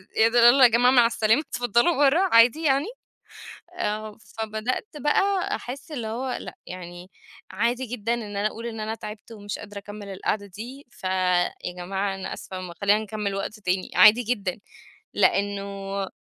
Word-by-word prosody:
إيه 225 - +5
ده، 235 0 +4
يالّا 260 +2 +7
يا 245 - +9
جماعة 245 +3 +4
مع 245 -3 +6
السلامة، 225 +3 +2
اتفضلوا 245 +4 +1
برّا، 290 +4 +4 0.2
عادي 240 +8 +6
يعني؟ 280 +1 +2 0.9
آه، 215 -4 -3 0.2
فبدأت 220 - -3
بقى 390 +6 +1
أحس 270 +5 -8
اللي 240 -7 -4
هو 250 +4 -3
لأ، - - -9
يعني 180 0 -9 0.4
عادي 235 +6 0
جدًا 230 -1 -2
إن 210 -4 -5
أنا 205 +1 +1
أقول 230 +2 -7
إن 225 -1 -6
أنا 220 +1 -3
تعبت 210 +1 -9
ومش 205 -2 -6
قادرة 205 0 -9
أكمّل 205 0 -9
القعدة 200 +1 -2
دي. 235 +9 -10
فيا 185 -4 0 0.2
جماعة 195 +2 -3
أنا 190 - -5
آسفة، 185 -2 -7
خلّينا 205 +2 +4
نكمّل 210 -2 -4
وقت 210 +2 -5
تاني، 185 -1 -2
عادي 215 +6 +7
جدًا. 210 -5 -2 0.5
لإنه 200 -1 -1
215 Hz, 160 wpm, -25 LUFS, 200-245 Hz, 0.9 s, يا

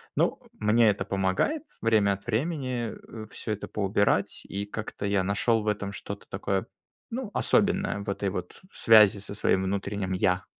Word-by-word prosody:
Ну, - - +1
мне 110 +1 +4
это 100 - 0
помогает 100 - 0 0.2
время 110 -3 +3
от 100 0 -9
времени, 125 -1 -1 0.3
э, - - -10
всё 110 - -5
это 105 -1 -4
поубирать, 100 0 +1
и 100 +1 -4
как-то 105 0 -6
я 100 -1 +2
нашел 110 +4 +2
в - - -6
этом 100 -1 -1
что-то 100 0 -7
такое, 95 0 -2 0.4
ну, 235 -2 -4
особенное, 200 - +1
в 100 0 -6
этой 100 0 -1
вот 90 -1 -6
связи 110 -2 +6
со 100 - -6
своим 95 -2 +2
внутренним 100 0 -2
я. 90 0 +1
100 Hz, 165 wpm, -27 LUFS, 100-115 Hz, 0.4 s, связи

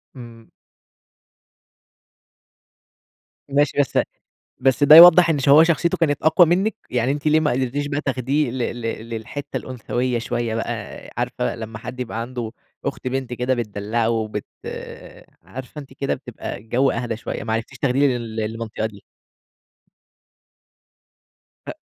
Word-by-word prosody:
إمم. 115 -2 -12 3.0
ماشي 145 +2 +1
بس 140 - +1 0.6
بس 135 +2 +3
ده 155 +2 +9
يوضّح 175 0 +10
إن 150 - +1
شو 140 +3 +6
شخصيته 170 0 +2
كانت 145 -4 +1
أقوى 160 +3 +5
منِّك؟ 190 +7 +1 0.2
يعني 125 +2 +1
أنتِ 145 +1 -5
ليه 155 +1 +4
ما 150 - +1
قدرتيش 130 +3 -1
بقى 145 0 -2
تاخديه 135 +1 -1
ل 130 - -5 0.2
ل - - -9 0.3
للحتة 115 +5 -6
الأنثوية 125 0 -2
شوية 115 -1 -2
بقى، 115 - -2 0.5
عارفة - - -2
لمّا 110 -1 -7
حد 125 +3 -8
يبقى 115 -2 -4
عنده 120 -1 -5 0.3
أخت - - -4
بنت 130 -1 -3
كده 125 +2 0
بتدلعوه 110 0 -1
بت 105 -1 -5 1.0
عارفة 130 +3 -9
أنتِ 135 -2 -13
كده 140 +1 -2
بتبقى 125 -6 -7
الجو 120 +6 +1
أهدي 120 -2 -3
شوية - - -5
ما 110 - -2
عرفتيش 115 0 -4
تاخدي 140 +1 +2
لل 115 -2 -7
للمنطقة 110 0 -3
دي؟ 100 -2 -11 2.6
هأ - - -5
125 Hz, 135 wpm, -21 LUFS, 115-145 Hz, 3.0 s, يوضّح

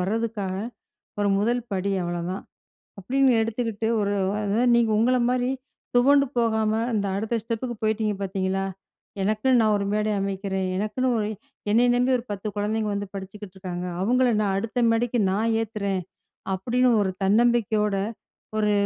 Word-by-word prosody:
வரதுக்காக 205 0 -2 0.7
ஒரு 205 - +2
1 235 +4 +1
படி 195 +1 -1
அவ்வளோதான், 175 +2 -3 0.6
அப்படின்னு 265 +7 +2
எடுத்துக்கிட்டு 225 -1 -1
ஒரு 205 0 0 0.3
அதாவது 210 +4 +1
நீங்க 235 -2 +3
உங்கள 250 +3 +3
மாரி 250 0 +1 0.5
துவண்டு 280 +3 +5
போகாம 220 -2 +2 0.2
இந்த 205 -2 0
அடுத்த 220 +3 -2
ஸ்டெப்புக்கு 235 +2 -3
போயிட்டிங்க 215 -1 +1
பார்த்தீங்களா, 190 0 -1 0.6
எனக்குன்னு 215 +5 +3
நான் 215 -1 +3
ஒரு 200 - -1
மேடை 215 0 +1
அமைக்கிறேன். 195 -1 -2
எனக்குன்னு 215 +6 -1
ஒரு, 210 - 0 0.4
என்னைய 235 +4 +4
நம்பி 250 +1 +2
ஒரு 235 - -7
10 205 +1 -4
குழந்தைங்க 210 +1 -1
வந்து 200 0 -3
படிச்சுக்கிட்டுருக்காங்க. 190 -2 -6 0.2
அவங்கள 250 +5 +3
நான் 200 -2 +1
அடுத்த 225 +4 -1
மேடைக்கு 235 +1 +1
நான் 220 +4 +1
ஏத்துறேன் 200 -4 -2 0.5
அப்படின்னு 245 +6 +2
ஒரு 190 - 0
தன்னம்பிக்கையோட 215 -1 +2 0.6
1 210 -1 +2
215 Hz, 135 wpm, -25 LUFS, 195-235 Hz, 0.7 s, துவண்டு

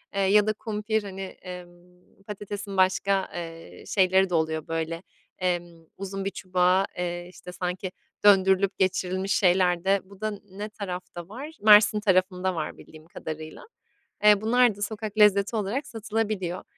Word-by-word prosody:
ya 200 +2 +4
da 215 - +2
kumpir, 215 0 -2
hani, 195 -1 -7
emm, 180 0 -12
patatesin 205 -1 -6
başka, 190 +1 +2
eee, 165 -1 -8
şeyleri 190 -1 +3
de 180 - -5
oluyor, 160 -1 -1
böyle, 165 +1 -3 0.4
emm, 175 -2 -3
uzun 195 0 -5
bir - - +1
çubuğa, 185 0 +1
eee, 175 0 -3
işte, 180 0 -11
sanki, 180 +1 -4 0.3
döndürülüp 195 -1 +4
geçirilmiş 190 +1 0
şeyler 180 -2 +3
de. 195 +1 +3
Bu 195 +1 -17
da 215 -2 -3
ne 205 +3 -6
tarafta 180 -4 -7
var? 270 +9 -7
Mersin 210 0 +7
tarafında 185 -2 +1
var 155 -2 -4
bildiğim 155 0 -15
kadarıyla. 155 -1 -8 0.6
Eee, 210 -1 +6
bunlar 240 0 +3
da 205 - -12
sokak 215 0 -4
lezzeti 205 +1 +4
olarak 225 +8 -2
satılabiliyor. 215 -5 -3
190 Hz, 145 wpm, -26 LUFS, 180-205 Hz, 0.6 s, Mersin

